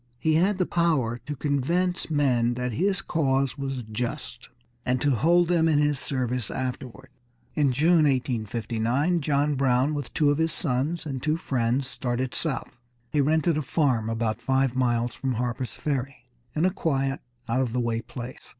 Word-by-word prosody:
He 155 +6 +1
had 185 +5 +3
the 185 - +1
power 150 -10 +1
to 150 - -3
convince 165 +7 0
men 125 -6 +2
that 125 0 -2
his 190 - 0
cause 135 -4 +1
was 135 -3 -4
just, 115 +1 -5 0.3
and 125 0 +1
to 145 +3 +2
hold 170 +8 +4
them 165 -2 +3
in 155 -2 +3
his 145 -2 +2
service 125 -4 -2
afterward. 130 0 -5 0.4
In 145 -3 +2
June, 155 +5 +4
1859, 120 - 0
John 145 +1 +1
Brown, 135 +1 +2
with 145 -4 -4
two 145 -2 +4
of 145 - 0
his 160 0 +2
sons, 155 +3 -1
and 135 -4 -4
two 155 +3 +1
friends, 130 -4 0
started 125 -1 -3
south. 135 -5 -3 0.3
He 150 - +2
rented 155 +2 +2
a - - -1
farm 130 -6 +1
about 115 -1 -1
five 135 -1 +1
miles 120 -2 +1
from 135 -2 -2
Harper's 120 0 -3
Ferry, 135 -3 -3 0.3
in 155 +3 +2
a 185 - +3
quiet, 135 -7 -1 0.3
out 120 +3 +1
of 125 -3 -1
the 125 - -1
way 115 -1 0
place. 120 +2 -8
135 Hz, 170 wpm, -26 LUFS, 125-155 Hz, 0.4 s, hold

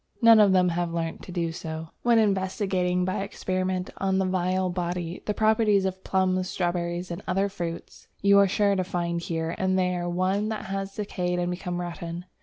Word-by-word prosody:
None 230 -2 +7
of 205 -2 +6
them 180 -1 +4
have 170 0 -1
learnt 165 -1 -3
to - - -10
do 170 -2 -1
so. 160 0 -6
When 235 -1 +4
investigating 190 -3 +1
by 185 +1 -1
experiment, 185 -1 -2
on 190 -1 +1
the 190 - +2
vile 185 0 0
body, 175 -1 -3
the 210 - 0
properties 215 -2 +3
of 190 0 -3
plums, 185 -1 +1
strawberries, 175 0 -2
and 170 - -5
other 195 +2 +1
fruits, 170 -4 -6
you 200 0 +5
are 200 - +6
sure 200 +1 +2
to 185 - +1
find 170 -1 -2
here 165 -1 -2
and 190 0 +1
there 180 -1 0
one 190 +4 0
that 220 - -4
has 195 0 -4
decayed 180 -4 -2
and 175 0 0
become 180 0 -4
rotten. 175 0 -5
185 Hz, 190 wpm, -26 LUFS, 175-195 Hz, -, None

